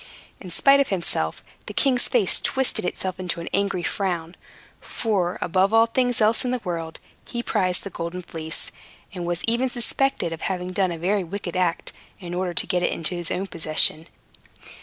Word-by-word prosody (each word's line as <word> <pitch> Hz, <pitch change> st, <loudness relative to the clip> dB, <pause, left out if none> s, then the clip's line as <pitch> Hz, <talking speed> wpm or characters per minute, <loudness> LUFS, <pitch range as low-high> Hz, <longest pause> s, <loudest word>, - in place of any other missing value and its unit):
In 185 Hz, -, -9 dB
spite 275 Hz, +10 st, +5 dB
of 280 Hz, -, +3 dB
himself, 170 Hz, -, -1 dB, 0.2 s
the -, -, -7 dB
king's 255 Hz, -3 st, +2 dB
face 225 Hz, -8 st, +3 dB
twisted 265 Hz, -8 st, 0 dB
itself 185 Hz, +1 st, -3 dB
into 180 Hz, -2 st, -3 dB
an 170 Hz, -, -6 dB
angry 200 Hz, -3 st, 0 dB
frown; 175 Hz, -4 st, -2 dB, 0.5 s
for, 190 Hz, -6 st, -1 dB
above 190 Hz, +4 st, +2 dB
all 225 Hz, 0 st, +7 dB
things 245 Hz, +1 st, +1 dB
else 220 Hz, +1 st, +3 dB
in 250 Hz, -, -1 dB
the 250 Hz, 0 st, 0 dB
world, 165 Hz, -3 st, -4 dB, 0.2 s
he 240 Hz, -1 st, -5 dB
prized 185 Hz, -6 st, +1 dB
the 200 Hz, -, -6 dB
Golden 170 Hz, +2 st, -5 dB
Fleece, 160 Hz, -2 st, -3 dB, 0.4 s
and 175 Hz, -2 st, -4 dB
was 175 Hz, 0 st, -1 dB
even 235 Hz, +3 st, +1 dB
suspected 240 Hz, -6 st, 0 dB
of 165 Hz, -, -8 dB
having 180 Hz, -1 st, -2 dB
done 185 Hz, -1 st, +1 dB
a 170 Hz, -, -4 dB
very 190 Hz, +4 st, +1 dB
wicked 180 Hz, 0 st, -5 dB
act, 180 Hz, -2 st, 0 dB, 0.3 s
in 175 Hz, -3 st, -7 dB
order 180 Hz, -1 st, -2 dB
to -, -, +5 dB
get 180 Hz, -, 0 dB
it -, -, +1 dB
into 165 Hz, +2 st, -1 dB
his 175 Hz, -1 st, -4 dB
own 190 Hz, +2 st, -1 dB
possession. 160 Hz, -2 st, +3 dB
185 Hz, 185 wpm, -24 LUFS, 170-220 Hz, 0.5 s, all